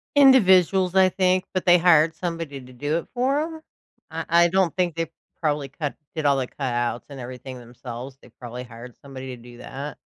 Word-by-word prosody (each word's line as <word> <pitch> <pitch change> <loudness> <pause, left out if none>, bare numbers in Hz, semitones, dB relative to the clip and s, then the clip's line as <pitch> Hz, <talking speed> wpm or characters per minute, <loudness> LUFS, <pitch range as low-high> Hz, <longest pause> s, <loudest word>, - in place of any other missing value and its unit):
Individuals, 190 - +5
I 190 -1 +6
think, 185 0 +1
but 185 - -2
they 175 -1 +7
hired 160 -2 +4
somebody 165 -5 -4
to 130 0 -14
do 145 +6 -1
it 170 - -5
for 260 +3 +1
'em. 320 0 -5 0.5
Uh, 165 0 -5
I 170 +1 +5
don't 185 -1 +1
think 175 -3 0
they 165 -1 -3 0.3
probably 145 -3 -1
cut 145 +1 -4 0.2
did 155 -2 -3
all 140 -1 +4
the 130 -2 -1
cutouts, 120 -3 -2
and 140 -2 -9
everything 125 +1 -8
themselves, 120 +2 -9
they - - -17
probably 125 0 -7
hired 120 +1 -11
somebody 130 -2 -8
to 120 - -16
do 120 0 -13
that. 140 +2 -7
150 Hz, 195 wpm, -24 LUFS, 130-180 Hz, 0.5 s, they